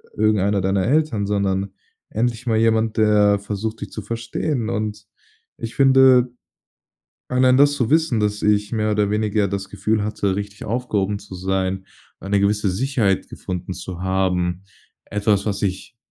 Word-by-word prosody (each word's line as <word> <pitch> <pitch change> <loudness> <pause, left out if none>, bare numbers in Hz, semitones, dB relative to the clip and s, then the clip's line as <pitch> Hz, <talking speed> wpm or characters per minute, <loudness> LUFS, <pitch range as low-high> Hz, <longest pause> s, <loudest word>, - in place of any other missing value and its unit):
irgendeiner 105 -2 +2
deiner 95 +1 +1
Eltern, 135 -6 +1
sondern 100 -1 -1 0.4
endlich 120 +2 -2
mal 110 -2 +2
jemand, 110 -1 +2
der 105 -2 +4
versucht, 105 +2 -4
dich - - -5
zu 110 - -6
verstehen. 115 +2 -3
Und 105 -1 -3 0.5
ich 115 - -6
finde, 130 -2 +5 1.0
allein 125 0 +4
das 145 +1 +5
zu 125 -5 -1
wissen, 160 -8 +2
dass 105 0 -1
ich 105 0 +1
mehr 110 -1 0
oder 105 -1 +1
weniger 105 -1 +1
das 95 0 -4
Gefühl 105 +2 0
hatte, 100 -2 -1
richtig 100 0 -6
aufgehoben 105 -4 -1
zu 100 -2 -11
sein, 95 +1 -2 0.3
eine 100 +1 0
gewisse 100 0 +1
Sicherheit 110 -2 0
gefunden 90 0 -5
zu 90 0 -7
haben, 95 -1 0 0.4
etwas, 105 0 0
was 100 0 -2
ich 95 +4 -3
105 Hz, 150 wpm, -21 LUFS, 100-115 Hz, 1.0 s, finde